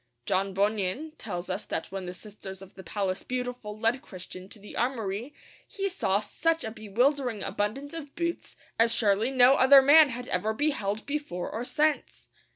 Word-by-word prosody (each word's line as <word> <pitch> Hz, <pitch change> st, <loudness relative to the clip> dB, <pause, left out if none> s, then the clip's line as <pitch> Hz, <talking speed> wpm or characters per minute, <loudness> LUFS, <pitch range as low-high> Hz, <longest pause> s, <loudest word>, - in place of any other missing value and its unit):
John 195 Hz, 0 st, 0 dB
Bunyan 205 Hz, +8 st, 0 dB
tells 180 Hz, -5 st, -5 dB
us 190 Hz, +2 st, -3 dB
that -, -, -3 dB
when 190 Hz, -2 st, -5 dB
the 180 Hz, -, -5 dB
sisters 195 Hz, -1 st, -9 dB
of 190 Hz, -, -15 dB
the 190 Hz, -, -11 dB
Palace 190 Hz, 0 st, -2 dB
Beautiful 245 Hz, -4 st, -4 dB
led 230 Hz, +4 st, +1 dB
Christian 185 Hz, 0 st, -10 dB
to -, -, -10 dB
the 205 Hz, 0 st, -11 dB
armoury 230 Hz, -1 st, -2 dB, 0.4 s
he 395 Hz, -1 st, -2 dB
saw 205 Hz, -, +1 dB
such 325 Hz, +10 st, 0 dB
a 220 Hz, -, -4 dB
bewildering 240 Hz, +2 st, 0 dB
abundance 270 Hz, +9 st, -3 dB
of 295 Hz, -4 st, -8 dB
boots 340 Hz, 0 st, -3 dB, 0.2 s
as 230 Hz, 0 st, +5 dB
surely 215 Hz, +1 st, +2 dB
no 255 Hz, 0 st, +6 dB
other 270 Hz, 0 st, +7 dB
man 295 Hz, +2 st, +8 dB, 0.2 s
ever 215 Hz, +5 st, -1 dB
beheld 220 Hz, -7 st, -1 dB
before 285 Hz, -12 st, -4 dB
or 225 Hz, -, -3 dB
since! 300 Hz, +3 st, -1 dB
220 Hz, 165 wpm, -28 LUFS, 195-275 Hz, 0.4 s, man